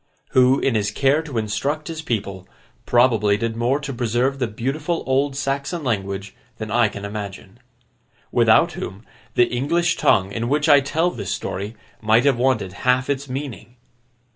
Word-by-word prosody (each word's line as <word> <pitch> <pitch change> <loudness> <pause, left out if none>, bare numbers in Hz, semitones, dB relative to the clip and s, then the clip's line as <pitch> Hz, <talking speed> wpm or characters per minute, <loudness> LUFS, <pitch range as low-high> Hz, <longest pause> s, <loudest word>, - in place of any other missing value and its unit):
Who, 130 +1 +4
in 135 - +1
his 105 -2 +1
care 140 +7 +2
to 150 -7 -6
instruct 140 +8 -2
his 165 -1 -5
people, 100 - -4 0.4
probably 115 -4 +3
did 115 +1 -2
more 120 +5 +1
to 140 -2 -5
preserve 125 +3 0
the 125 - 0
beautiful 140 +9 -2
old 135 +1 +1
Saxon 140 +4 -2
language, 100 -4 -3 0.2
than 110 -2 -6
I 120 0 +4
can 100 -1 -7
imagine. 100 +1 -7 0.7
Without - - +4
whom, 95 +5 -7 0.3
the 120 - +5
English 155 +9 0
tongue 95 0 +3
in 115 +3 -3
which 150 +2 +1
I 145 -2 +7
tell 160 +5 0
this - - -5
story 100 +4 -4 0.3
might 110 +3 +3
have 135 -4 +3
wanted 115 -8 +1
half 125 +2 +2
its 140 0 -3
meaning. 130 -2 -6
125 Hz, 165 wpm, -22 LUFS, 110-140 Hz, 0.7 s, I